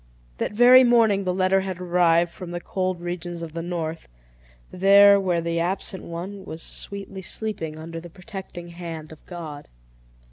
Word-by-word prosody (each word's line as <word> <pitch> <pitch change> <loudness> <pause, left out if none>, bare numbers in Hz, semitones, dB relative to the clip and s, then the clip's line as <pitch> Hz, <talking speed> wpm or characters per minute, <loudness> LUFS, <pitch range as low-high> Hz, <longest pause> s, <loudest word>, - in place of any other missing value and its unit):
That - - -2
very 250 +3 +8
morning 225 -5 +4
the 180 - +1
letter 190 +1 +3
had 190 -2 -5
arrived 175 -1 +3
from 180 -1 -9
the 175 0 -4
cold 185 0 -2
regions 175 -1 -5
of 160 -2 -7
the 165 - -4
north; 165 - -4 0.6
there, 200 +2 +7
where 180 -3 0
the 170 0 -1
absent 185 +2 -2
one 185 +4 -7
was 160 -3 -7
sweetly 195 -1 -6
sleeping 175 -5 -4
under 165 +1 -7
the 170 +1 -11
protecting 185 -2 -9
hand 165 -2 -8
of 160 - -14
God. 160 -5 -8
175 Hz, 165 wpm, -24 LUFS, 170-195 Hz, 0.6 s, very